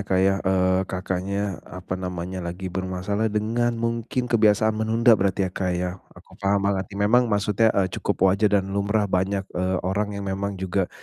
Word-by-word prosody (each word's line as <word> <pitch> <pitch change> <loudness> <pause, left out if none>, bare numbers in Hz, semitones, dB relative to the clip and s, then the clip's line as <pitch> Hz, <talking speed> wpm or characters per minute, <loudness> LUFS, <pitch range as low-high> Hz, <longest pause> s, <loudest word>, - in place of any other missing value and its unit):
Kak, 95 - +2
ya, 95 - +3
eee, 95 0 +2
Kakaknya, 95 +1 -3 0.2
apa 90 0 -7
namanya, 90 0 -4
lagi 90 +1 -5
bermasalah 95 +4 -2
dengan 115 +3 0
mungkin 115 +2 -2
kebiasaan 110 -1 +4
menunda 115 +2 +4
berarti 95 -2 +2
ya, 90 - -3
Kak, 90 -1 -1
ya. 90 +1 -1 0.3
Aku - - -17
paham 100 0 +1
banget 95 -2 0
nih, 100 0 -2
memang 120 +3 +4
maksudnya, 105 +2 +2
eee, 100 - +4 0.2
cukup - - 0
wajar 105 +2 +2
dan 95 - +1
lumrah 105 +1 +1
banyak, 95 0 0
eee, 95 0 -2
orang 100 +2 -1
yang 100 - -5
memang 100 +1 -3
juga 95 0 -1
100 Hz, 180 wpm, -24 LUFS, 95-105 Hz, 0.3 s, kebiasaan